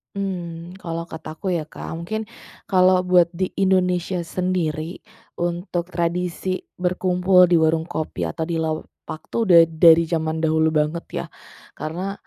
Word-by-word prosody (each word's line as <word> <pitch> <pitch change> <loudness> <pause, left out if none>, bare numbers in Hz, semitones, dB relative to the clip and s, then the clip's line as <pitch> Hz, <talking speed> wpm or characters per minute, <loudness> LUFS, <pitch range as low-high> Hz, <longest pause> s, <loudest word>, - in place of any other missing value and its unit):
Mmm, 175 -2 -5
kalau 170 -2 -5
kataku 160 +3 -6
ya 155 - -4
Kak, - - -9
mungkin 220 +6 -4 0.4
kalau 185 -1 +5
buat 180 -1 +3
di 185 +2 -1
Indonesia 180 -2 +1
sendiri, 170 -2 -2 0.4
untuk 175 0 -2
tradisi 180 +2 -2 0.2
berkumpul 180 0 +3
di 175 - +5
warung 160 +1 +1
kopi 155 - -4
atau 160 - -3
di 165 -1 -2
lapak 155 0 -5
tuh 230 -3 0
udah 170 -2 +8
dari 165 0 +5
zaman 160 -1 -1
dahulu 160 0 +2
banget 155 +2 -1
ya. - - -3 0.5
Karena, 180 +6 -4
170 Hz, 135 wpm, -22 LUFS, 160-185 Hz, 0.5 s, udah